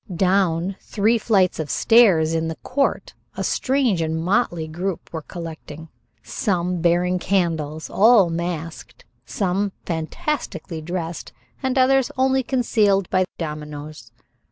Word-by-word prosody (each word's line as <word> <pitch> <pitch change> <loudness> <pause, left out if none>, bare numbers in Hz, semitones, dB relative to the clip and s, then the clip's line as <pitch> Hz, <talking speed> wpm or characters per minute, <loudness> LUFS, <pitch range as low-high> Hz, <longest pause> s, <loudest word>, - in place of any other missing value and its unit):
Down 185 0 +1
three 220 +3 +1
flights 195 -6 +2
of 155 -2 -3
stairs 185 -9 +4
in 165 0 0
the 160 - -4
court 275 - -1 0.2
a - - -2
strange 255 -9 +1
and 160 0 -1
motley 175 -3 0
group 175 +3 -5
were 160 - -4
collecting, 160 -1 -9 0.3
some 180 -4 -1
bearing 175 +2 +2
candles, 160 -5 -1
all 210 -4 +5
masked, 165 -1 -5 0.2
some 195 0 -1
fantastically 165 - -4
dressed 170 0 -5 0.3
and 265 -1 -1
others 265 0 +4
only 265 0 +2
concealed 215 -7 +1
by 185 0 +3
dominoes. 150 -5 -7
180 Hz, 120 wpm, -22 LUFS, 160-215 Hz, 0.3 s, all